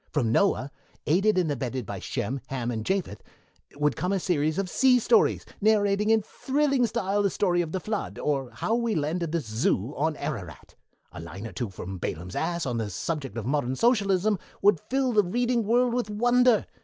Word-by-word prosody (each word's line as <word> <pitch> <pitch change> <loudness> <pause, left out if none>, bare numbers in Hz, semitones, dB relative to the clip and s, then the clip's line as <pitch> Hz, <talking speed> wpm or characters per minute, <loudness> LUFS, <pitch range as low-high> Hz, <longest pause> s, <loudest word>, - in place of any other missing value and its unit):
From 120 -7 0
Noah, 140 - +2 0.3
aided 195 +6 +3
and 170 -5 +2
abetted 130 -3 -3
by - - -5
Shem, 130 +6 -3
Ham, 125 -3 -3
and 110 -2 -3
Japhet, 185 - -2 0.5
would 150 -1 +1
come 180 - -1
a 195 - +1
series 155 -3 0
of 195 -1 -1
sea 255 +6 +4
stories 235 -1 +3 0.2
narrating 210 -1 +3
in 220 -1 +4
thrilling 275 +2 +1
style 205 -3 0
the 200 - +2
story 180 -3 +1
of 165 -2 -4
The 185 - -2
Flood, 215 +2 -4
or 135 -4 -1
How 220 - -2
We 235 -2 0
Landed 160 +2 -1
the 170 0 0
Zoo 110 +1 -1
on 155 +2 0
Ararat. 110 - -6 0.4
A - - -9
line 90 +5 -8
or 115 - -6
two 115 +4 -3
from 95 0 -7
Balaam's 85 +2 -5
Ass 170 0 -1
on 120 -3 -2
the 110 -2 -2
subject 135 - -4
of 110 - -4
modern 130 -1 0
Socialism 205 - +2 0.2
would 200 -4 +4
fill 265 -1 +1
the 210 - +5
reading 235 +4 0
world 240 +1 +3
with 245 -3 -1
wonder. 245 +2 +3
175 Hz, 190 wpm, -26 LUFS, 130-215 Hz, 0.5 s, the